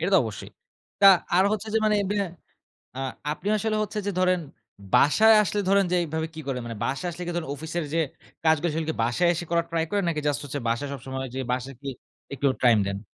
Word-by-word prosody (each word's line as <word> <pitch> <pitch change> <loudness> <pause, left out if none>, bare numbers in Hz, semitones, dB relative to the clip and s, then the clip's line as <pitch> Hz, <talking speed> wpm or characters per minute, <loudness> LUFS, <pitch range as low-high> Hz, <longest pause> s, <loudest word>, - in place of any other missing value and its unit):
এটা 175 +4 0
তো - - +8
অবশ্যই। 105 -3 -7 0.5
তা 200 - +8 0.3
আর 185 - +5
হচ্ছে 215 +1 -3
যে - - +5
মানে 215 -1 +3 0.2
ব্যা 205 -1 +1 0.7
আ - - -5 0.3
আপনি 190 - -5
আসলে 215 +1 -1
হচ্ছে 215 0 -4
যে - - +1
ধরেন 185 -1 +3 0.5
বাসায় 220 +10 +6
আসলে 205 +1 -1
ধরেন 200 0 +4
যে - - +4
এইভাবে 160 -1 -2
কি 160 - -6
করে 130 -2 -1
মানে 115 -1 -6
বাসায় 160 +7 -2
আসলে 175 +1 -8
কিন্ত 175 0 -2 0.2
অফিসের 160 +3 -4
যে - - +2 0.5
কাজগুলো 160 +1 +3
সেগুলো 160 0 -2
কী - - -3
বাসায় 125 +10 +2
এসে 175 - -4
করার 170 0 +1
ট্রাই 165 -1 0
করেন 200 -2 0
নাকি 160 -3 -1
জাস্ট 145 - 0
হচ্ছে 145 0 -4
বাসায় 115 +5 -1
সবসময় 130 0 -5
যে 135 - -2
বাঁশে 130 +1 -2
কি 140 - -6 0.4
একটু 140 +1 -1
টাইম 120 -3 +5
দেন? 100 0 -3
160 Hz, 215 wpm, -25 LUFS, 140-190 Hz, 0.7 s, তো